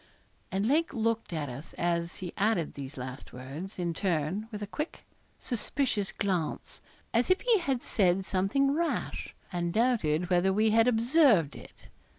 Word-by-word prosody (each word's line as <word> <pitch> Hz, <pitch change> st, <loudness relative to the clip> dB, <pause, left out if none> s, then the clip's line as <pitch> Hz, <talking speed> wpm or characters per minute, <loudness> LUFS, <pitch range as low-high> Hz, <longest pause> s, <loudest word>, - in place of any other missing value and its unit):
And 195 Hz, +2 st, 0 dB
Lake 295 Hz, +4 st, +2 dB
looked 230 Hz, -2 st, 0 dB
at 155 Hz, -3 st, -2 dB
us, 135 Hz, +5 st, -8 dB
as 170 Hz, 0 st, -1 dB
he 180 Hz, -2 st, -6 dB
added 200 Hz, -6 st, +1 dB
these 140 Hz, 0 st, -7 dB
last 130 Hz, +1 st, -7 dB
words, 140 Hz, +10 st, -7 dB
in 175 Hz, -2 st, -1 dB
turn, 180 Hz, +3 st, -1 dB
with 210 Hz, -2 st, -5 dB
a -, -, -1 dB
quick, 300 Hz, -, -5 dB, 0.3 s
suspicious 240 Hz, -3 st, -1 dB
glance, 185 Hz, -6 st, -2 dB, 0.3 s
as 235 Hz, +1 st, +2 dB
if 370 Hz, -, +3 dB
he 470 Hz, -4 st, +4 dB
had 270 Hz, -8 st, -1 dB
said 190 Hz, -2 st, +2 dB
something 200 Hz, +10 st, +2 dB
rash, 335 Hz, +2 st, -2 dB, 0.2 s
and 175 Hz, -1 st, -1 dB
doubted 180 Hz, -7 st, +1 dB
whether 180 Hz, +2 st, +4 dB
we 215 Hz, +3 st, +3 dB
had 225 Hz, +2 st, +5 dB
observed 235 Hz, -, +4 dB
it. -, -, -14 dB
195 Hz, 160 wpm, -29 LUFS, 170-235 Hz, 0.3 s, had